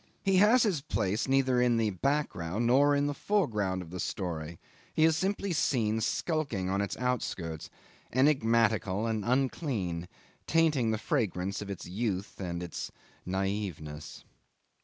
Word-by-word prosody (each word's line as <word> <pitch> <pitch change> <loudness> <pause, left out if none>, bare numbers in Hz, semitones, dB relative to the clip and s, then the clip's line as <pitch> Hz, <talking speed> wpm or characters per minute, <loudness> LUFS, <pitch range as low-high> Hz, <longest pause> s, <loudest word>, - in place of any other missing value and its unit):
He 195 -2 +3
has 220 +6 +6
his 190 -10 +1
place 105 -7 -1
neither 130 -2 +3
in 120 -1 +3
the 110 -2 +1
background 105 - -1
nor 140 +4 +5
in 145 0 +2
the 145 - 0
foreground 105 - 0
of 85 - -13
the 90 - -6
story; 85 -3 -4 0.4
he 155 - +3
is 160 0 +5
simply 195 +1 -1
seen 110 -8 +1
skulking 115 - -1
on 100 +1 +1
its 100 - -3
outskirts, 95 -10 -2 0.4
enigmatical 115 -6 +2
and 110 -2 -1
unclean, 120 - -1 0.4
tainting 155 -8 +3
the 110 - +1
fragrance 100 - -1
of 100 - -6
its 100 - -6
youth 100 0 -3
and 85 -1 -3
of - - -4
its - - -5 0.4
naiveness. 95 -6 -3
110 Hz, 145 wpm, -30 LUFS, 95-140 Hz, 0.4 s, has